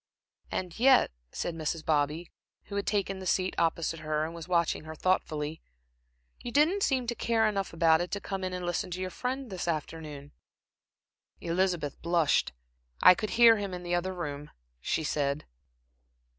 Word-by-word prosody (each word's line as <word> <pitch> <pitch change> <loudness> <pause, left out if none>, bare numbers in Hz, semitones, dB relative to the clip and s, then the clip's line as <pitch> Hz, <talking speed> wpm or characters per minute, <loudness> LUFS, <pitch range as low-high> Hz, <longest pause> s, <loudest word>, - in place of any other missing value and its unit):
"And 180 +1 -4
yet," 260 - +5 0.2
said 175 - -3
Mrs. 160 0 -3
Bobby, 155 +2 0 0.3
who 200 - -8
had 200 - -2
taken 195 -2 0
the 185 - -6
seat 185 +1 +1
opposite 165 0 0
her 155 0 -1
and 165 - -6
was 165 -2 -8
watching 170 -3 +1
her 160 0 -7
thoughtfully, 155 -3 -1 0.8
"you 240 - -5
didn't 315 +9 +3
seem 260 -8 +1
to 240 - -1
care 230 -1 +1
enough 195 -2 -1
about 165 -1 +4
it 175 - -3
to 200 - -3
come 195 -1 -5
in 185 - -2
to 180 -1 -4
listen 175 +1 -2
to 180 +1 -5
your 185 0 -3
friend 260 +1 -4
this 180 -2 -4
afternoon." 150 -3 -4 1.1
Elizabeth 170 -4 -1
blushed. 170 -3 +2 0.5
"I - - +10
could 215 +3 -4
hear 230 -1 +8
him 200 -3 -4
in 180 - -7
the 175 0 -3
other 185 +2 -1
room," 150 -3 -5 0.3
she 160 - -1
said. 145 -1 -1
175 Hz, 170 wpm, -29 LUFS, 155-195 Hz, 1.1 s, I